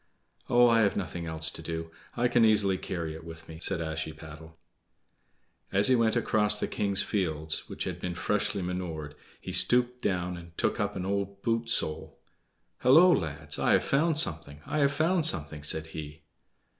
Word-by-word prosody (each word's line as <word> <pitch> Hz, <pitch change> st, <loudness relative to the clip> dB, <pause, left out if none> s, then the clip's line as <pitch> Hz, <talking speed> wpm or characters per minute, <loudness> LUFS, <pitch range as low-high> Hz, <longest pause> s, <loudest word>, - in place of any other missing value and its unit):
"Oh, 120 Hz, 0 st, +6 dB
I 115 Hz, -1 st, +4 dB
have 100 Hz, -2 st, +1 dB
nothing 90 Hz, -3 st, -4 dB
else 80 Hz, 0 st, -3 dB
to -, -, -8 dB
do. 80 Hz, 0 st, -5 dB, 0.3 s
I 120 Hz, +1 st, +3 dB
can 120 Hz, -1 st, +3 dB
easily 105 Hz, -3 st, +4 dB
carry 85 Hz, -4 st, -4 dB
it 80 Hz, +1 st, -10 dB
with 80 Hz, 0 st, -10 dB
me," 80 Hz, 0 st, -10 dB
said 95 Hz, -3 st, +1 dB
Ashiepattle. 80 Hz, 0 st, -7 dB, 1.1 s
As 100 Hz, +5 st, +3 dB
he 130 Hz, -, +5 dB
went 115 Hz, -2 st, +2 dB
across 105 Hz, -1 st, +3 dB
the -, -, -1 dB
king's 100 Hz, -1 st, +1 dB
fields, 80 Hz, -6 st, -2 dB
which -, -, -4 dB
had -, -, -5 dB
been 90 Hz, -1 st, -4 dB
freshly 100 Hz, +1 st, -1 dB
manured, 85 Hz, -5 st, -5 dB, 0.3 s
he -, -, -7 dB
stooped 125 Hz, 0 st, +2 dB
down 90 Hz, -2 st, -1 dB
and 85 Hz, -1 st, -13 dB
took -, -, 0 dB
up -, -, -1 dB
an 90 Hz, -, -4 dB
old 100 Hz, 0 st, -3 dB
boot 115 Hz, 0 st, 0 dB
sole. 80 Hz, -8 st, 0 dB, 0.6 s
"Hullo, 165 Hz, +8 st, +6 dB
lads! 80 Hz, -, -3 dB
I -, -, +3 dB
have -, -, +3 dB
found 155 Hz, +3 st, +1 dB
something! 80 Hz, -, -1 dB
I 155 Hz, -, -2 dB
have 140 Hz, -1 st, +3 dB
found 165 Hz, +4 st, +1 dB
something!" 75 Hz, -, -3 dB
said 80 Hz, +1 st, -2 dB
he. 75 Hz, 0 st, -8 dB
90 Hz, 180 wpm, -28 LUFS, 80-115 Hz, 1.1 s, Oh